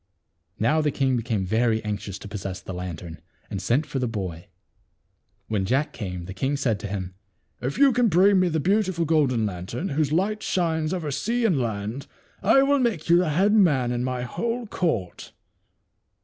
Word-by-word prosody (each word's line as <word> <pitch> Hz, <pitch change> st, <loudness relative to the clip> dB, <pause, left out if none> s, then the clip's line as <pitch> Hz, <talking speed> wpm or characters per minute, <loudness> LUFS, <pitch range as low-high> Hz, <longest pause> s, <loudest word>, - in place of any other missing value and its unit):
Now 140 Hz, +9 st, +2 dB
the 150 Hz, -, +1 dB
king 135 Hz, -2 st, +1 dB
became 115 Hz, -5 st, -1 dB
very 110 Hz, +3 st, +1 dB
anxious 105 Hz, -2 st, -4 dB
to 105 Hz, -, -10 dB
possess 100 Hz, -2 st, -5 dB
the 95 Hz, -, -8 dB
lan 90 Hz, -2 st, -5 dB
tern, 80 Hz, 0 st, -10 dB, 0.3 s
and 95 Hz, -, -3 dB
sent 120 Hz, +10 st, +1 dB
for 140 Hz, -2 st, -3 dB
the 125 Hz, -, 0 dB
boy. 95 Hz, -7 st, -5 dB, 1.0 s
When 105 Hz, -3 st, 0 dB
J 110 Hz, +7 st, +1 dB
ack 150 Hz, +2 st, -1 dB
came, 90 Hz, -5 st, -5 dB
the 95 Hz, -, -7 dB
king 135 Hz, +8 st, -1 dB
said 115 Hz, -7 st, 0 dB
to 105 Hz, -, -5 dB
him, 95 Hz, -2 st, -4 dB, 0.2 s
" -, -, -44 dB
If 130 Hz, +3 st, -3 dB
you 275 Hz, -2 st, +5 dB
can 245 Hz, -1 st, +3 dB
bring 190 Hz, +1 st, +5 dB
me 185 Hz, -1 st, +3 dB
the 160 Hz, -1 st, 0 dB
beautiful 185 Hz, 0 st, +1 dB
golden 140 Hz, -8 st, +2 dB
lantern, 100 Hz, -, -4 dB
whose 145 Hz, 0 st, 0 dB
light 200 Hz, +6 st, 0 dB
shines 160 Hz, -3 st, 0 dB
over 175 Hz, -5 st, -2 dB
the -, -, -3 dB
sea 230 Hz, -, 0 dB
and 170 Hz, -11 st, +2 dB
land, 110 Hz, +3 st, -3 dB, 0.3 s
I 245 Hz, +7 st, +5 dB
will 280 Hz, +1 st, +3 dB
make 220 Hz, -11 st, -1 dB
you 170 Hz, -, +7 dB
the 180 Hz, -2 st, +2 dB
head 190 Hz, +7 st, +3 dB
man 145 Hz, -, +4 dB
in 120 Hz, 0 st, -1 dB
my 125 Hz, -1 st, -2 dB
whole 235 Hz, -, -3 dB
court." 160 Hz, -, -2 dB
135 Hz, 200 wpm, -25 LUFS, -, 1.0 s, you